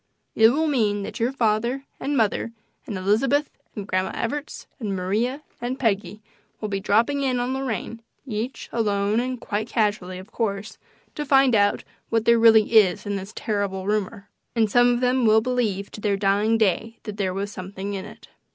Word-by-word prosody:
It 220 0 +6
will 305 +6 +1
mean 215 -9 +1
that - - -6
your 235 +3 +1
mother 235 +4 +1
and 285 0 -1
father, 225 +1 0 0.3
and 205 - -4
Elizabeth, 240 +10 +1 0.2
and 205 - -5
Grandma 185 0 0
Evarts 290 +6 -4
and 205 -5 -2
Maria 220 +10 -1 0.2
and 245 +2 -3
Peggy 210 -3 -1 0.4
will 215 - -4
be 195 -1 -1
dropping 230 +9 +2
in 255 -2 0
on 245 +2 -1
Lorraine, 230 -3 -4 0.2
each 235 +1 -4
alone 210 -1 +1
and 250 0 -2
quite 215 0 -3
casually, 205 -5 0
of 190 +4 -11
course, 205 -2 -3 0.3
to 300 - -3
find 270 -2 +4
out 205 -2 +3 0.3
what 225 -1 +1
there 235 0 +5
really 225 -1 +6
is 190 -2 +1
in 205 0 -2
this 195 +1 -6
terrible 200 -3 -2
rumor. 205 0 -2 0.3
And 220 -3 +2
some 245 +1 +5
of 240 0 0
them 250 0 +2
will 215 +1 +6
believe 220 -5 -1
to 210 - -9
their 205 -2 +1
dying 205 +3 +2
day 225 +2 0
that 210 -1 -7
there 195 -2 0
was 200 +2 -3
something 190 +1 -6
in 195 -1 -4
it." - - -13
220 Hz, 185 wpm, -24 LUFS, 200-245 Hz, 0.4 s, It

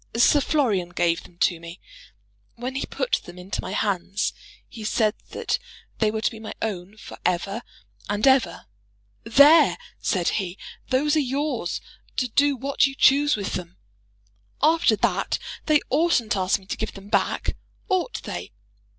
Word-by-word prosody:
Sir 285 +5 +5
Florian 220 - +1
gave 170 -1 +1
them 175 - -17
to 170 - +2
me. 170 +1 -10 0.8
When 245 +2 -5
he 270 - -3
put - - -1
them 175 +1 -11
into 180 +1 -4
my 185 - -5
hands, 200 -1 -1 0.3
he 225 - -10
said 215 0 +2 0.2
that - - -2 0.4
they 220 - +3
were 220 0 -3
to - - +1
be 225 - -10
my 220 - -7
own 200 -1 -4
for - - -11
ever 195 +5 -1 0.5
and 205 +1 0
ever. 265 -3 +3 0.6
'There,' 285 +8 +6 0.2
said 180 -4 0
he, 190 -2 -3 0.3
'those 290 +4 +2
are - - +5
yours 270 - -1 0.4
to 250 - +1
do 285 +4 +3
what 275 +2 +2
you 270 - -7
choose 285 +2 +5
with 200 -2 -4
them.' 175 -1 -5 0.8
After 310 -6 +4
that 205 - 0 0.3
they 305 -2 +4
oughtn't 285 -7 +2
to 195 - +2
ask 185 +1 +2
me 195 - -18
to - - -4
give 220 -1 -3
them 195 +1 -11
back, - - 0 0.3
ought 375 +3 -1
they? - - -6
220 Hz, 165 wpm, -24 LUFS, 190-275 Hz, 0.8 s, There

